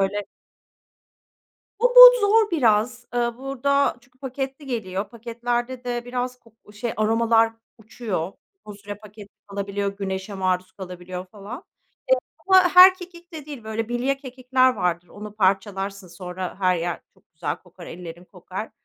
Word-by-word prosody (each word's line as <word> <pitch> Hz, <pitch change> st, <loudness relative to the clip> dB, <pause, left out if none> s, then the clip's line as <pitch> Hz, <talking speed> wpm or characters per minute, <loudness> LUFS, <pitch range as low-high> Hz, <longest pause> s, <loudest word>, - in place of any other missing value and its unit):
böyle 200 Hz, +1 st, 0 dB, 1.5 s
O -, -, +4 dB
bod -, -, +10 dB
zor 430 Hz, +1 st, +3 dB
biraz, 240 Hz, -5 st, +1 dB
eee, 235 Hz, -1 st, 0 dB
burada 275 Hz, +1 st, 0 dB
çünkü 250 Hz, +1 st, -28 dB
paketli 270 Hz, +1 st, -5 dB
geliyor 205 Hz, -6 st, -3 dB
paketlerde 240 Hz, +2 st, -4 dB
de 240 Hz, -1 st, -3 dB
biraz 250 Hz, 0 st, -4 dB
ko 230 Hz, -3 st, -23 dB, 0.2 s
şey 220 Hz, +3 st, -4 dB
aromalar 225 Hz, +1 st, +3 dB, 0.3 s
uçuyor, 210 Hz, -5 st, -4 dB, 0.3 s
uzun 205 Hz, -1 st, -10 dB
süre 205 Hz, 0 st, -6 dB
paketli 210 Hz, 0 st, -13 dB, 0.2 s
kalabiliyor, 200 Hz, 0 st, -3 dB
güneşe 190 Hz, 0 st, -4 dB
maruz 185 Hz, -1 st, -1 dB
kalabiliyor 180 Hz, -1 st, -8 dB
falan, 205 Hz, +4 st, -9 dB
eee, 330 Hz, -, -14 dB, 0.8 s
ama 375 Hz, -1 st, +8 dB
her 370 Hz, +1 st, +10 dB
kekik 350 Hz, -1 st, -13 dB
de 305 Hz, -3 st, -8 dB
değil, 280 Hz, -7 st, -9 dB
böyle 220 Hz, +1 st, -3 dB
bilye 245 Hz, +3 st, 0 dB
kekikler 255 Hz, -1 st, +1 dB
vardır. 175 Hz, -3 st, -2 dB
Onu 210 Hz, 0 st, -10 dB
parçalarsın, 195 Hz, -1 st, -1 dB
sonra 180 Hz, +1 st, -7 dB
her 185 Hz, -1 st, +3 dB
yer 170 Hz, 0 st, -3 dB
çok -, -, -31 dB
güzel 155 Hz, -2 st, -3 dB
kokar, 180 Hz, 0 st, -15 dB
ellerin 175 Hz, 0 st, -9 dB
kokar. 185 Hz, +3 st, -8 dB
220 Hz, 145 wpm, -23 LUFS, 190-255 Hz, 1.5 s, bod